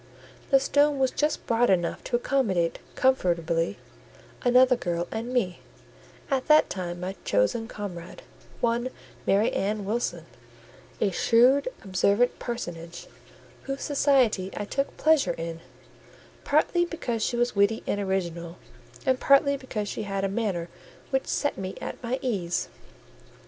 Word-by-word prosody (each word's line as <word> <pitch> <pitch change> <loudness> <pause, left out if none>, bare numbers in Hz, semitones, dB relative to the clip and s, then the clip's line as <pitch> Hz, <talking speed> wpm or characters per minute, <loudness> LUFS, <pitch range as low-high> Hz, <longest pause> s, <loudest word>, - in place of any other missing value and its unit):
The 275 - +6
stone 285 +2 +3
was 265 -1 +2
just 300 +1 -1
broad 235 +1 +2
enough 175 -3 +1
to 245 - -1
accommodate, 215 -10 +1 0.2
comfortably, 170 -8 +1 0.6
another 250 0 +5
girl 175 -6 -2
and 230 +2 -4
me, 195 -9 0 0.7
at 265 -1 0
that 305 0 +5
time 175 -2 -4
my 185 +2 -4
chosen 105 - +1
comrade—one 210 +5 -4 0.4
Mary 205 +4 +3
Ann 205 +1 -1
Wilson; 195 -6 -2 0.7
a 200 - +2
shrewd, 250 - +4 0.2
observant 200 +5 +2
personage, 170 -8 -6 0.6
whose 275 0 -4
society 265 -9 +2
I 205 - -2
took 275 +6 -2
pleasure 315 -2 +3
in, 165 0 -5 0.8
partly 310 +4 +2
because 255 -10 -3
she 240 - 0
was 240 -1 +1
witty 200 +2 +2
and 205 - -1
original, 175 -3 -3 0.5
and 260 -1 +2
partly 280 0 +4
because 245 -6 -4
she - - -4
had 195 -1 -3
a - - +2
manner 195 -5 -2 0.4
which 265 -1 0
set 290 - -1
me 190 0 -5
at - - -6
my 245 +1 -2
ease. 185 -9 -1
220 Hz, 135 wpm, -26 LUFS, 185-260 Hz, 0.8 s, The